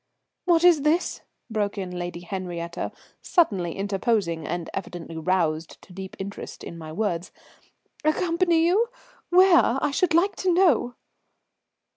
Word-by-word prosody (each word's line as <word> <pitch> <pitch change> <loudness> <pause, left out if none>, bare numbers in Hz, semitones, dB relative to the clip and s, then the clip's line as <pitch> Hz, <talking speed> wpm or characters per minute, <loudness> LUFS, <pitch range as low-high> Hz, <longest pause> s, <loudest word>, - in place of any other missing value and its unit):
"What 345 -1 +4
is 345 -4 +6
this?" 315 +4 +1 0.3
broke 210 -3 -2
in 185 -2 -4
Lady 175 -1 -5
Henriette, 175 -2 -5 0.3
suddenly 195 - +1
interposing 195 -4 0
and 175 0 -3
evidently 175 -3 -6
roused 160 -2 -1
to 180 - -15
deep 190 +1 -8
interest 195 +1 -7
in - - -7
my 160 -2 -8
words. 180 -2 -2 0.7
"Accompany 335 +1 +2
you? 405 +7 +3 0.4
Where, 355 -8 +5
I 295 - 0
should 330 +3 +1
like 370 +4 +3
to 375 - +1
know?" 335 -9 +3
200 Hz, 130 wpm, -25 LUFS, -, 0.7 s, is